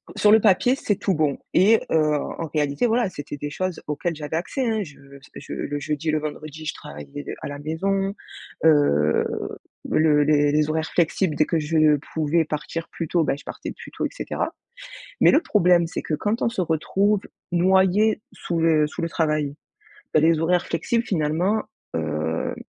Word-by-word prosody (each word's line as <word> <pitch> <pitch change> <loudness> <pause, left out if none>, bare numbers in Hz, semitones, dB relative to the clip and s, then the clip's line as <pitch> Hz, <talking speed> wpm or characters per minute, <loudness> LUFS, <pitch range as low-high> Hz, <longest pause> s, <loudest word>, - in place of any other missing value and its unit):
Sur 210 - +4
le 220 - +8
papier, 220 +5 +4
c'est 210 -6 -1
tout 195 - 0
bon 150 -4 +1 0.2
et 210 +5 +5
heu, - - +2 0.2
en 165 - -5
réalité 145 +6 +1
voilà, 235 0 +2
c'était 145 -4 -7
des 145 +1 -5
choses 185 +1 -3
auxquelles 155 +3 -2
j'avais 150 +1 -5
accès 250 - -2
hein 220 -1 0
je 150 -6 -13
parce 140 -1 -15
que - - -10
je - - -8
le 145 0 -3
jeudi 150 +2 -2
et - - +3
le 155 - +1
vendredi 155 +1 -7
je - - -2
travaillais 70 -1 -9 0.2
à - - -4
la 145 0 -6
maison. 195 +6 -1 0.5
Heu, 110 - +4 0.6
le 150 -2 +4
les 145 -1 +3
les 150 +1 +2
horaires 160 +1 -1
flexibles 170 -1 +1
dès 155 - +3
que 165 - 0
je 155 -1 +3 0.2
pouvais 160 +1 +1
partir 155 +2 -4
plus 165 - -5
tôt, 170 +1 +2
bah 145 - 0
je - - -14
partais - - -6
plus - - -12
tôt - - -3
et - - -1
cetera, - - -3 0.7
mais - - +6
le 305 - +4
problème 180 - +3
c'est - - -5
que 155 - -4
quand 210 +8 -1
on - - +3
se 230 -5 -2
retrouve 195 +5 +1 0.3
noyé 190 +4 +3
sous 170 -1 -3
le 160 -2 +4
sous 165 - -7
le 170 - -1
travail, 150 -3 0 0.6
heu, 155 - +6
les 160 0 +4
horaires 175 +2 +1
flexibles 230 +8 -1
finalement, 175 +4 0 0.3
heu 80 0 -2
160 Hz, 195 wpm, -23 LUFS, 150-185 Hz, 0.7 s, le